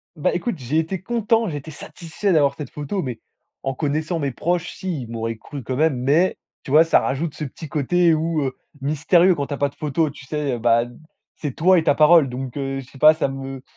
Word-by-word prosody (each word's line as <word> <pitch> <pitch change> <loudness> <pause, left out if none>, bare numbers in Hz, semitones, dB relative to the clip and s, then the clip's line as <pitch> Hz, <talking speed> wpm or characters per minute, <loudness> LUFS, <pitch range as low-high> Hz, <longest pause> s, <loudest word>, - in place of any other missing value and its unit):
Bah, 150 - 0
écoute, 190 +5 -2
j'ai 135 +3 -2
été 165 +3 -3
content, 225 0 +1
j'étais 150 +1 -6
satisfait 185 +2 -4
d'avoir 145 -4 +3
cette 145 -4 -7
photo. 150 +7 -4
Mais, 125 -6 -5 0.4
en 135 0 -1
connaissant 155 +4 -1
mes 140 -2 -1
proches, 175 +7 -1
si, 180 -7 -4
ils 120 - -7
m'auraient 115 -1 -4
cru 140 +4 -8
quand 130 +3 -3
même, 155 -1 +2
mais, 145 +9 +2 0.3
tu - - -7
vois? 155 +3 +7
Ça 165 - +4
rajoute 145 +3 -2
ce - - -5
petit 150 +3 -7
côté 165 +4 +2
où 160 0 0
heu, 130 -1 -3 0.2
mystérieux 165 +6 +3
quand 140 -2 -3
tu - - -4
as - - -3
pas 140 - +1
de - - -23
photo, 155 +1 0
tu 140 -1 -12
sais? 145 -1 -2
Heu, - - -2
bah, 115 0 +3 0.5
c'est 145 -4 -4
toi 180 +6 +4
et 165 - +2
ta 145 - +3
parole 155 -2 +6
donc, 125 0 -6
heu, 135 -1 -3
je 135 - -8
sais - - -15
pas, 155 +3 +7
ça 155 - -1
me 135 -1 -6
150 Hz, 235 wpm, -22 LUFS, 135-165 Hz, 0.5 s, vois